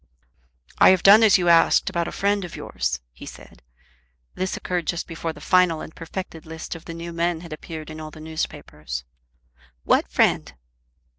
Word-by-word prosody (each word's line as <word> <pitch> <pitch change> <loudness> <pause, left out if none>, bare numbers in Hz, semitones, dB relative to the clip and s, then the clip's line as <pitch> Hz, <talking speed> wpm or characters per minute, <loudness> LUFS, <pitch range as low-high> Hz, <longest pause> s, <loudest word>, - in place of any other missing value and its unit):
"I - - +8
have 185 -1 +4
done 205 +3 +8
as 215 -3 +6
you 180 -1 -1
asked 170 -1 +5
about 170 -1 -1
a - - -5
friend 200 0 0
of 175 - -7
yours," 60 +1 -3
he - - -12
said. - - -13 0.7
This 185 0 -3
occurred 180 -3 -3
just 170 - -2
before 165 0 -5
the 155 - -13
final 180 0 +3
and 160 - -9
perfected 165 -1 -7
list 160 0 -6
of 165 -1 -11
the 165 - -7
new 170 0 -7
men 170 0 -1
had 170 -3 -8
appeared 155 0 -8
in 155 0 -8
all 155 - -7
the 155 - -13
newspapers. 75 - -5 0.8
"What - - +2
friend?" - - +1
165 Hz, 180 wpm, -23 LUFS, 155-180 Hz, 0.8 s, I